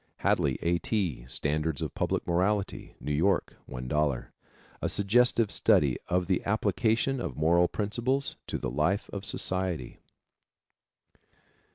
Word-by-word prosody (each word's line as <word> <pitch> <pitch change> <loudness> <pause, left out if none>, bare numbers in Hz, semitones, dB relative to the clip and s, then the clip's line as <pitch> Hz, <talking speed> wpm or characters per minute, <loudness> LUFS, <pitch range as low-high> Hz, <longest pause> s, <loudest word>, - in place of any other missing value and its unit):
Hadley, - - +2
A. 85 +1 +2
T., 90 - -1
Standards 75 +3 -1
of - - -3
Public - - -1
Morality. 95 +4 -1
New 75 - -4
York, 85 +6 +1
$1.00. 65 +1 -1 0.5
A - - 0
suggestive 110 +1 +3
study 70 -4 +3
of 90 0 +1
the 90 0 0
application 110 +5 +1
of 65 - -4
moral 85 +3 +4
principles 120 +8 -1
to - - -2
the 65 - -3
life 85 - 0
of 100 -1 -4
society. 95 -10 -2
90 Hz, 125 wpm, -29 LUFS, 75-105 Hz, 0.5 s, moral